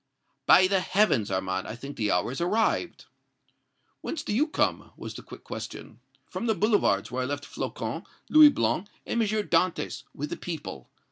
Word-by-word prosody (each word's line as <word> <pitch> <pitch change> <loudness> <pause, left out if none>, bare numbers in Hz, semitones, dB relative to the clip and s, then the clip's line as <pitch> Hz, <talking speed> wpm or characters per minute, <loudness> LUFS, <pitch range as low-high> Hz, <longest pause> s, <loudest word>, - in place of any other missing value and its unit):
"By 185 - +8
heavens, 185 - +2
Armand, 95 0 -2
I 110 - -5
think 140 +4 -8
the 105 -2 -1
hour 90 +6 +1
has 135 - -5
arrived!" 220 - 0 1.0
"Whence 305 -3 -4
do 210 - -3
you 285 +9 +2
come?" 305 - 0
was - - -7
the - - -8
quick - - -12
question. - - -8 0.3
"From 235 - -4
the 220 - +2
Boulevards, 195 - +2
where 130 +1 -2
I 125 - -1
left 145 +1 -4
Flocon, - - -4 0.2
Louis 305 -1 +9
Blanc 205 -8 0 0.2
and 235 - 0
M. 220 - +2
Dantès, 205 -4 0
with 150 +2 -5
the - - -3
people. 165 -4 -7
180 Hz, 175 wpm, -27 LUFS, -, 1.0 s, Louis